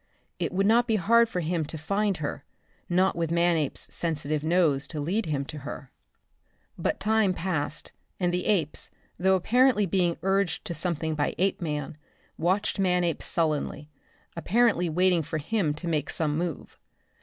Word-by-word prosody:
It - - -1
would 195 +2 +1
not 235 +3 +4
be 225 - +2
hard 230 +4 +4
for 180 -5 -2
him 165 0 -1
to 160 - -6
find 200 +5 0
her 150 -1 -4 0.5
not 185 +2 +2
with 165 -1 -1
Manape's 170 -3 0
sensitive 155 -2 -2
nose 155 -5 +2
to 155 - -5
lead 185 +9 -1
him 140 -3 -1
to 150 - -7
her. 140 -1 -8 0.8
But - - -1
time 215 -3 +2
passed 155 -5 -2 0.3
and 175 -1 +1
the 180 - -1
apes, 175 -8 0 0.3
though 190 +1 +4
apparently 240 +3 +3
being 175 -2 +1
urged 195 -3 0
to 170 - -3
something 165 -2 -1
by 150 -1 -1
Apeman, 155 -6 -1 0.4
watching 190 +4 0
Manape 180 -3 +1
sullenly, 155 -2 -1 0.4
apparently 190 0 +2
waiting 180 +1 +3
for 155 +1 -4
him 160 +1 0
to 170 +3 -6
make 155 -3 -1
some 150 -2 -1
move. 170 -1 -4
175 Hz, 155 wpm, -27 LUFS, 155-190 Hz, 0.8 s, not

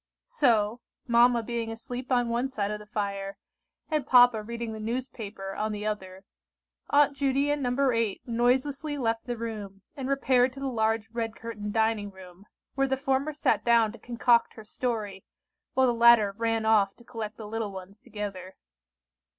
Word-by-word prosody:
So, 235 - +2 0.2
mamma 235 -1 +4
being 230 0 -3
asleep 245 +3 -7
on 245 -1 +3
one 240 +3 0
side 210 -6 -2
of 210 - -4
the 210 - -13
fire, 200 -2 -3 0.5
and 305 -2 0
papa 245 -3 +6
reading 230 +1 -5
the 220 - -7
newspaper 220 -4 -5
on 215 +2 -2
the 210 0 -5
other, 190 -3 -4 0.7
Aunt 290 -1 +4
Judy 275 +1 +1
and 290 0 -1
No. 260 +1 +1
8 230 -4 -1
noiselessly 260 +5 0
left 225 -3 -1
the 240 -1 -3
room, 210 -4 -6
and 270 -1 -4
repaired 260 -2 +3
to 275 - -10
the 275 - -4
large 225 -3 0
red 225 -1 -3
curtained 210 -3 -6
dining 220 -2 +1
room, 190 0 -15 0.3
where 270 0 +1
the 265 0 0
former 270 +2 0
sat 295 -1 +1
down 230 -2 +4
to 235 - -13
concoct 235 0 +2
her 220 - -10
story, 215 -4 -4 0.5
while 260 - +4
the 245 - +2
latter 235 -3 +6
ran 225 0 0
off 205 -3 +3
to 240 - -18
collect 220 -3 -6
the 220 - -8
little 220 -1 -3
ones 190 +2 -10
together. 205 -5 -7
230 Hz, 175 wpm, -27 LUFS, 210-250 Hz, 0.7 s, papa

